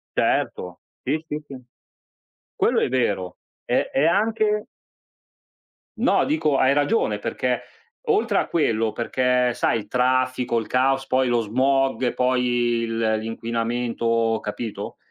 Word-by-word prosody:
Certo, 90 -1 -1 0.2
sì, 155 +1 -2
sì, 150 -1 -5
sì. 135 -2 -9 1.0
Quello - - +2
è - - +2
vero, 100 -8 -1 0.3
è - - 0
è 140 +3 +2
anche 210 +3 +1 1.3
No 225 -4 +3
dico, 155 -2 +1
hai 130 0 +4
ragione 145 - +1
perché, 125 +3 -2 0.5
oltre 430 -1 +2
a - - 0
quello, 115 -9 +1
perché 125 +1 +1
sai 115 - 0
il 110 - -5
traffico, 130 -1 +1
il 110 - -3
caos, 135 +1 +1
poi 130 -1 +1
lo 120 -1 +2
smog, 130 +3 +1
poi 125 0 +1 0.4
il 115 0 -3 0.2
l'inquinamento, 115 0 -1
capito? 105 +1 -6
125 Hz, 125 wpm, -23 LUFS, 115-140 Hz, 1.3 s, hai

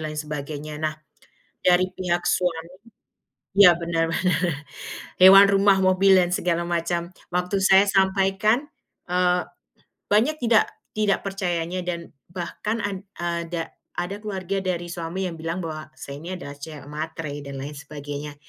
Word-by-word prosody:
lain 155 - -6
sebagainya. 150 0 -5
Nah, 155 -1 -1 0.7
dari 180 0 +5
pihak 175 -2 -1
suami 170 -2 0 0.9
ya 180 -4 +9
bener 165 -1 0
bener. 180 -4 0 0.6
Hewan, 195 +1 +10
rumah, 195 0 +4
mobil, 190 0 +5
dan 175 -1 +2
segala 170 -1 0
macam. 170 0 0 0.3
Waktu 180 +2 -1
saya 195 +1 +6
sampaikan, 195 +6 +2 0.4
eee, 180 0 +1 0.7
banyak 235 +9 +3
tidak 230 -2 +4 0.2
tidak 210 -2 +1
percayanya 180 -2 -2
dan 170 -1 -4 0.2
bahkan, 195 +5 -3
ad 200 -2 -2 0.2
ada 170 -1 -3 0.2
ada 180 +3 -3
keluarga 195 -2 -3
dari 175 -2 -3
suami 170 +2 -4
yang 165 - -9
bilang 165 +3 -3
bahwa 155 -2 -5
saya 140 0 -8
ini 170 +5 -6
adalah 145 -6 -8
cewek 150 0 -8
matre 155 0 -5 0.2
dan 135 -1 -6
lain 145 +2 -6
sebagainya. 145 0 -7
175 Hz, 135 wpm, -24 LUFS, 165-190 Hz, 0.9 s, Hewan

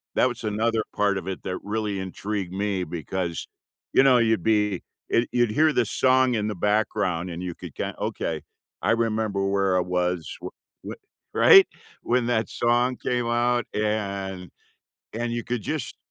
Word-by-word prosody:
That - - +4
was 120 -1 -7
another 110 +1 0
part 100 -2 +2
of 95 0 -6
it 95 - -5
that 95 -1 -3
really 105 -2 -2
intrigued 95 0 -4
me, 100 -1 -1
because, 85 +1 -4 0.5
you - - +6
know, 130 -2 +6
you'd 110 -6 +2
be 105 -3 +2 0.3
eh, 115 - +3
you'd 120 -3 +2
hear 155 +6 +4
this 120 -4 +1
song 130 -1 +3
in 105 -1 0
the 105 - -3
background, 105 -3 0
and 85 +1 -6
you 90 -2 -4
could - - -10
ki - - -2
"Okay, 80 -2 -2 0.4
I - - +2
remember 110 -3 0
where 100 -1 +2
I - - +3
was 90 -1 -1
w - - -6 0.4
wh" - - -6 0.4
Right? 390 -1 +8 0.4
When 120 0 +1
that 110 -2 0
song 120 +2 +1
came 120 -1 -1
out, 120 0 +1
and 100 -3 -2 0.6
and 120 +1 -2
you 120 0 -2
could 120 -3 -3
just 155 0 -3
105 Hz, 170 wpm, -25 LUFS, 95-120 Hz, 0.6 s, Right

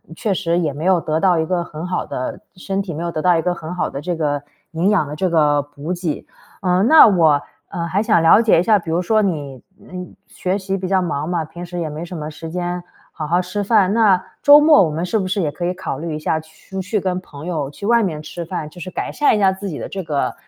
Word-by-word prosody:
确 205 +3 -1
实 170 -2 0
也 155 -5 -1
没 150 +4 -5
有 185 -1 +4
得 155 0 -1
到 180 -1 +3
一 160 - +1
个 175 +1 -1
很 155 0 -7
好 180 0 -2
的 130 - -5 0.2
身 195 +1 -3
体、 190 -4 -6
没 165 - -4
有 170 - -2
得 155 - -3
到 175 0 +4
一 - - +1
个 180 - +1
很 170 0 -7
好 180 - -1
的 140 - -5
这 175 +2 -2
个 145 -3 -1 0.3
营 170 +4 +1
养 195 -8 +2
的 145 - -6
这 185 +4 0
个 150 -3 +3
补 145 +4 -6
给。 175 -4 -4 0.4
呃， 180 -1 +2
那 310 +8 +8
我， 165 -8 +4 0.3
呃， 170 - -4
还 185 +4 0
想 215 - +3
了 165 +7 +7
解 220 -7 +4
一 - - +2
下， 210 +1 +4
比 170 - -9
如 165 +2 +1
说 215 +4 +2
你， 145 -9 -3 0.2
嗯 180 0 -9 0.2
学 185 +2 -2
习 195 -1 -3
比 185 -1 -4
较 190 0 +2
忙 155 -3 -2
嘛， 170 -3 -1
平 165 +3 -10
时 175 0 -7
也 165 - -2
没 150 +2 -6
什 175 0 -7
么 150 -1 -5
时 165 +2 -8
间 175 +1 -3 0.3
好 155 -2 -5
好 175 +3 +2
吃 185 +3 -3
饭。 200 -2 +3
那 205 -5 +4 0.2
周 290 0 +8
末 300 -5 +6
我 - - -2
们 160 +3 -2
是 215 +5 0
不 190 - -2
是 195 +2 -1
也 150 - -1
可 175 - -7
以 180 - 0
考 190 - -5
虑 160 -1 -4
一 - - -4
下 155 +1 0
出去 190 +6 -5
跟 185 -1 -1
朋 150 -4 -11
友 155 -6 -2
去 175 +7 -9
外 235 +2 +4
面 170 -8 -2
吃 170 +3 -6
饭， 165 -2 -4
就 175 - -14
是 185 - -6
改 - - -4
善 295 - +3
一 - - 0
下 195 -2 +4
自 195 +1 -5
己 155 - -5
的 - - -5
这 195 - -5
个， 150 -4 -1
175 Hz, 295 characters per minute, -19 LUFS, 160-190 Hz, 0.4 s, 那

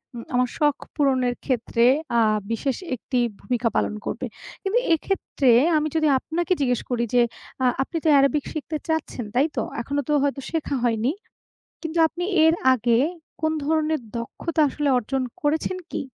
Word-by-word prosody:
উম 230 - -6
আমার 250 0 +2
শখ 295 -2 +2 0.2
পূরণের 260 -4 +2
ক্ষেত্রে 235 -2 +1 0.3
আ - - +5 0.3
বিশেষ 260 +3 -1 0.2
একটি 250 +2 -2 0.2
ভূমিকা 245 -2 0
পালন - - +1
করবে। - - -3 0.4
কিন্তু 395 +5 +2 0.2
এক্ষেত্রে 305 -7 0 0.3
আমি 305 0 +1
যদি 315 -1 +3
আপনাকে 345 +6 -1
জিজ্ঞেস 250 -3 +1
করি 235 -1 +1
যে, 245 - +6 0.4
আ - - +4 0.2
আপনি 330 - -5
তো - - +5
arabic 275 +1 +2
শিখতে 310 0 -3
চাচ্ছেন, 320 -7 -2
তাই 275 +4 +4
তো? 235 - +1 0.2
এখনো 285 +4 -2
তো - - +3
হয়তো 280 -1 -1
শেখা 315 -3 -1
হয়নি। 235 +1 +1 0.7
কিন্তু 325 0 -3
আপনি 350 +2 -5 0.2
এর 320 +1 +5 0.2
আগে 235 -1 +2 0.4
কোন 315 0 +2
ধরনের 310 0 +1 0.2
দক্ষতা 310 +7 -3
আসলে 290 +1 -1
অর্জন 260 +3 -2 0.2
করেছেন 315 +5 0
কি? - - -2
280 Hz, 160 wpm, -24 LUFS, 245-315 Hz, 0.7 s, যে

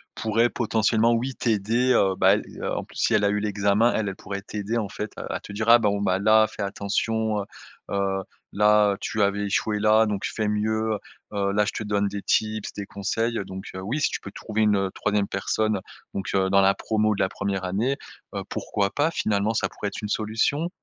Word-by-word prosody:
pourrait 115 +2 +2
potentiellement, 115 0 +2
oui, 125 +3 -1
t'aider, 115 +3 +1
heu, 95 -5 +3
bah, - - +5
elle, - - -3 0.2
heu, - - -2
en - - -3
plus, - - -14
si - - +2
elle 105 - +2
a 100 - +4
eu 105 0 0
l'examen 105 +2 +2
elle 105 -2 0
elle 95 - -6
pourrait 100 +1 -6
t'aider, 105 +3 -3
en 105 -4 -2
fait, 105 - -5
heu, - - -5
à - - -2
te - - -11
dire: 110 +2 -1
«Ah 120 - +9
bon, 100 -2 +1
bah, 95 -2 +1
là, 110 +1 +5
fais 110 - -8
attention, 105 +2 -1
heu 100 - -6 0.5
heu, 95 -1 0 0.3
là, 105 0 +4
tu 105 - -2
avais 100 +1 +1
échoué, 105 +2 0
là, 110 +1 +5
donc 105 -2 -2
fait 110 -1 -2
mieux, 110 +1 0
heu 105 - -3 0.4
heu, 100 -1 +1
là, 105 +1 +3
je 105 - -1
te 110 - -4
donne 100 -1 0
des 100 0 -4
tips, 110 -1 0
des 100 - -5
conseils», 115 +4 -2
donc 95 +1 -8
heu, 95 - -5
oui, 120 +11 -2
si - - +3
tu - - -3
peux - - -8
trouver 110 0 -3
une, 105 -1 +4
heu, 95 -1 -1
3e 105 -1 0
personne, 105 +2 0 0.3
donc 95 - -4
heu, 95 0 +2
dans 100 0 +5
la 95 0 +5
promo 110 -1 +1
de - - -7
la - - +2
1re 95 -1 -3
année, 110 +9 0 0.4
heu, - - -2
pourquoi 100 -1 -1
pas, 145 +6 +1
finalement, 105 -4 0
ça - - +1
pourrait 105 - -5
être - - -7
une 105 - -2
solution? 115 +11 0
105 Hz, 230 wpm, -25 LUFS, 100-110 Hz, 0.5 s, Ah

